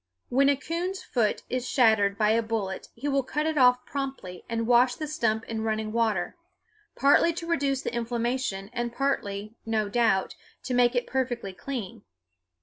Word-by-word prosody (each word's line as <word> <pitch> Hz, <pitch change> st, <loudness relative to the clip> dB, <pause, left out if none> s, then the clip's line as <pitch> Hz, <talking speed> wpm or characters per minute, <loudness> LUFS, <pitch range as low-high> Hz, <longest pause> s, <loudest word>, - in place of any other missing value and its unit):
When 275 Hz, +3 st, +4 dB
a 285 Hz, -, +4 dB
coon's 345 Hz, +7 st, -4 dB
foot 225 Hz, -5 st, 0 dB
is 255 Hz, 0 st, -3 dB
shattered 215 Hz, -5 st, +3 dB
by 215 Hz, -1 st, +3 dB
a 230 Hz, +1 st, +3 dB
bullet 220 Hz, -4 st, -3 dB
he 290 Hz, -, -5 dB
will 275 Hz, -1 st, +2 dB
cut 300 Hz, +4 st, -2 dB
it 315 Hz, 0 st, 0 dB
off 250 Hz, -2 st, +4 dB
promptly 265 Hz, -11 st, -5 dB
and 230 Hz, -1 st, -1 dB
wash 245 Hz, +1 st, +4 dB
the 310 Hz, -, -4 dB
stump 230 Hz, -7 st, 0 dB
in 225 Hz, -1 st, -4 dB
running 220 Hz, -1 st, -1 dB
water, 220 Hz, -5 st, 0 dB, 0.6 s
partly 285 Hz, +4 st, +4 dB
to 335 Hz, +1 st, -6 dB
reduce 280 Hz, -5 st, 0 dB
the -, -, -3 dB
inflammation 235 Hz, -3 st, -2 dB
and 240 Hz, -1 st, -2 dB
partly, 215 Hz, -6 st, -2 dB
no 220 Hz, -2 st, -1 dB
doubt, 215 Hz, -4 st, +2 dB, 0.3 s
to 255 Hz, -, -3 dB
make 245 Hz, 0 st, +3 dB
it 245 Hz, -, +1 dB
perfectly 245 Hz, -7 st, -2 dB
clean. 230 Hz, -2 st, -6 dB
240 Hz, 170 wpm, -27 LUFS, 220-270 Hz, 0.6 s, When